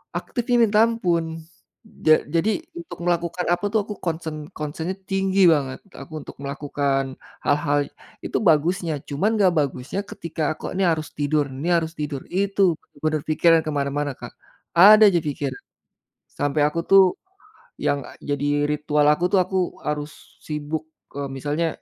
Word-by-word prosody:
aktifnya 245 -1 -1
minta 210 -1 +3
ampun. 170 -7 -1 0.6
Ja 155 0 +6
jadi 215 - +1 0.2
untuk 335 - -9
melakukan 175 0 0
apa 175 +4 +1
tuh, 220 - +3
aku 210 - -6
concern 160 -3 -4
concern-nya 160 +4 -4
tinggi 195 0 +1
banget. 135 -3 -2
Aku 160 - -11
untuk - - -11
melakukan, 140 -1 -2 0.2
hal-hal 145 0 +2 0.4
itu - - -2
bagusnya, 170 -1 +2
cuman 195 +11 0
nggak 195 -4 +4
bagusnya 140 +5 -2
ketika 155 -3 -3
aku - - -6
ini 195 +1 -1
harus 155 -2 -1
tidur 145 0 0
ini 140 +6 -5
harus 160 -1 0
tidur, 145 -2 -4
itu 200 +2 0 0.4
bener 155 -1 +1
pikiran 165 +1 +4
kemana-mana 145 -1 -1
Kak. - - -9 0.4
Ada 210 +5 +8
aja 170 - +2
pikir. 145 -2 -3 0.9
Sampai 145 +1 +1
aku 150 +3 0
tuh, 195 0 +8 0.8
yang 140 -2 0 0.2
jadi 145 +1 0
ritual 150 0 +1
aku 150 +4 +1
tuh, 195 - +5
aku 190 +1 -4 0.3
harus 150 0 -3 0.4
sibuk, 150 +1 -4 0.3
eee, 140 - -2
misalnya 145 +5 -2
155 Hz, 145 wpm, -23 LUFS, 145-180 Hz, 0.9 s, Ada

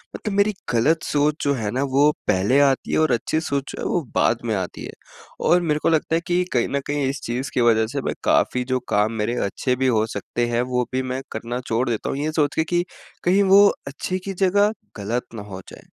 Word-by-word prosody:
मतलब 210 -3 -4
मेरी 205 +1 +3 0.2
गलत 150 +8 +2
सोच 150 +1 0
जो 140 0 +2
है 110 -5 -2
ना, 130 +2 0
वो 140 +2 +3 0.2
पहले 100 +9 +3
आती 135 -2 +2
है - - +2
और 155 -3 +3
अच्छी 125 +6 0
सोच 140 -3 -2
जो - - -7
है, - - -3
वो 175 - +1
बाद 115 - +3
में 110 -2 0
आती 95 -2 -4
है। - - -7 0.6
और 180 +1 +5
मेरे 150 -3 0
को - - +3
लगता 160 0 +1
है 165 - +1
कि 180 0 +2
कहीं 120 - +2
न 140 - 0
कहीं 145 -1 0
इस 140 - -4
चीज़ 125 +4 -3
की 125 - +1
वजह 110 -2 +3
से - - -3
मैं - - -2
काफ़ी 125 - +2
जो 130 - +2
काम 105 +2 +2
मेरे 115 +3 -1
अच्छे 125 +6 -1
भी 130 +1 0
हो 110 -3 +2
सकते 120 +1 -3
हैं, 120 0 0
वो 125 0 0
भी 130 - +1
मैं 130 0 -3
करना 115 +2 -4
छोड़ 115 +3 0
देता 115 -3 -2
हूँ, - - -2
ये 150 +2 -1
सोच 150 -2 0
के 160 - +2
कि 175 +2 0 0.4
कहीं 190 +3 +4
वो 195 +1 +7 0.2
अच्छे 145 +6 -3
की 195 - -3
जगह, 200 +3 +3 0.3
गलत 115 +5 -2
ना 110 - -5
हो 95 -2 -8
जाएँ। - - -13
135 Hz, 245 wpm, -22 LUFS, 120-160 Hz, 0.6 s, वो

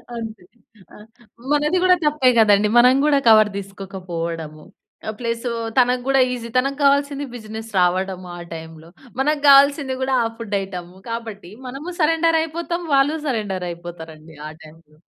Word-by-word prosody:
అంతే 225 -4 -7 0.5
ఆ! - - -13 0.5
మనది 300 +4 +2
గూడా 365 0 +5
తప్పే 295 -4 +3
గదండీ 210 -1 +4
మనం 250 +2 +6
గూడా 290 -2 +3
కవర్ 215 -1 +6
తీసుకోకపోవడము. 175 -5 -6 0.4
ఆ! - - -1
ప్లసూ 235 0 -3 0.3
తనకు 250 0 +2
గూడా 270 0 +3
ఈసీ 235 -1 -6
తనకు 275 +2 0
కావాల్సింది 280 0 +2
బిజినెస్ 220 0 -8
రావడము 185 0 0
ఆ - - -9 0.2
టైమ్‌లో. 160 0 -11 0.3
మనకు 295 +1 0
గావాల్సింది 280 -1 +5
గూడా 260 0 0
ఆ 230 - 0
ఫుడ్ 220 -3 -4
ఐటెము 180 -2 -8
కాబట్టి 220 -5 -7 0.2
మనము 280 +8 -7
సరెండర్ 325 +1 +3
అయిపోతాం 340 +2 -4
వాళ్ళు 280 +3 +3
సరెండర్ 205 -7 -2
అయిపోతారండి 160 -2 -11
ఆ - - -9
టైమ్‌లో. 155 -1 -18
225 Hz, 145 wpm, -20 LUFS, 180-275 Hz, 0.5 s, మనం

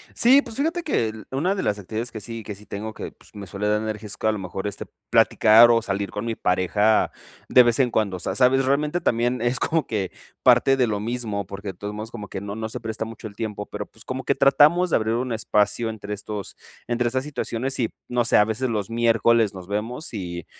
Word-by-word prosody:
Sí, 260 +4 +6
pues, 220 - -9
fíjate 325 +5 0
que 280 - 0
el 110 0 -9
una 165 +9 0
de 195 - -3
las 105 - 0
actividades 110 +5 -5
que 110 - -7
sí 115 +2 -6
que 105 -1 -6
sí 105 - -15
tengo 110 +2 -6
que, - - -7
pues, - - -15
me 100 -1 -8
suele 100 +3 -3
dar 105 0 +2
energía, 110 -1 -4
es 100 - -6
que - - -3
a 110 - +4
lo 105 - -3
mejor, 95 +1 -5
este, 100 - -5 0.2
platicar 115 +2 +6
o 115 -1 +4
salir 100 -1 -2
con 105 +2 -5
mi 115 - -2
pareja 105 +3 +2 0.4
de 125 - +7
vez 120 -1 +2
en 130 -3 +3
cuando, 105 -5 0
o - - -9
sea, - - -3
¿sabes? 130 +1 +4
Realmente 150 +5 +1
también 120 -1 0
es 120 +1 0
como 165 -1 0
que 100 -4 -2 0.3
parte 135 - +5
de 125 -2 +3
lo 105 -2 -1
mismo, 110 -3 -3
porque 100 +1 -7
de 95 - -5
todos 105 +3 -6
modos 110 +2 -6
como 105 -4 -8
que 95 - -5
no 100 +1 -6
no 110 0 -4
se - - -6
presta 110 -1 -4
mucho 110 0 -9
el 100 -1 -10
tiempo, 105 -2 -4
pero, - - -6
pues, 110 - -18
como 130 0 -5
que 140 - +2
tratamos 150 +6 +4
de - - +4
abrir 110 0 0
un 125 +1 -2
espacio 110 +1 +1
entre 105 -1 -6
estos 105 -1 -7 0.3
entre 120 0 0
esas 130 +3 -1
situaciones 135 -3 -3
y, 115 -4 -1 0.2
no 120 -1 +1
sé, - - +3
a 105 - +6
veces 115 +4 -2
los 105 -3 -2
miércoles 115 -1 +3
nos 90 -1 -9
vemos, 115 +7 -4
y, 85 -4 -5
110 Hz, 250 wpm, -23 LUFS, 105-125 Hz, 0.4 s, de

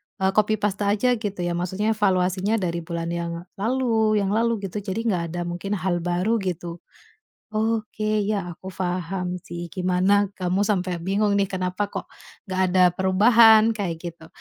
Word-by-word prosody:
eee, 190 -1 +1
copy-paste 210 -1 +1
aja 210 +5 +2
gitu 205 -4 -4
ya, 175 - -1
maksudnya 190 +5 -1
evaluasinya 190 0 +1
dari 170 -5 -1
bulan 170 0 -4
yang 170 0 -3 0.3
lalu 225 -2 +1
yang 200 -1 +1
lalu 225 -1 +1
gitu, 195 +2 -4
jadi 200 +1 -4
nggak 185 -7 0
ada - - -2
mungkin 180 +4 -3
hal 180 -2 -1
baru 180 +6 0
gitu. 175 -2 -4 0.7
Oke, 215 -1 -1
ya 195 -5 -2
aku 185 +2 -11
paham 180 0 -3
sih, 170 0 -8
gimana 185 +2 +2
kamu 190 +2 0
sampai 185 -4 -1
bingung 200 +4 +1
nih 195 - +2
kenapa 185 +1 -2
kok - - -7 0.3
nggak 185 -2 -2
ada 180 0 +4
perubahan, 220 +4 +6
kayak 195 -6 -3
gitu. 165 -2 -8
190 Hz, 160 wpm, -24 LUFS, 180-215 Hz, 0.7 s, perubahan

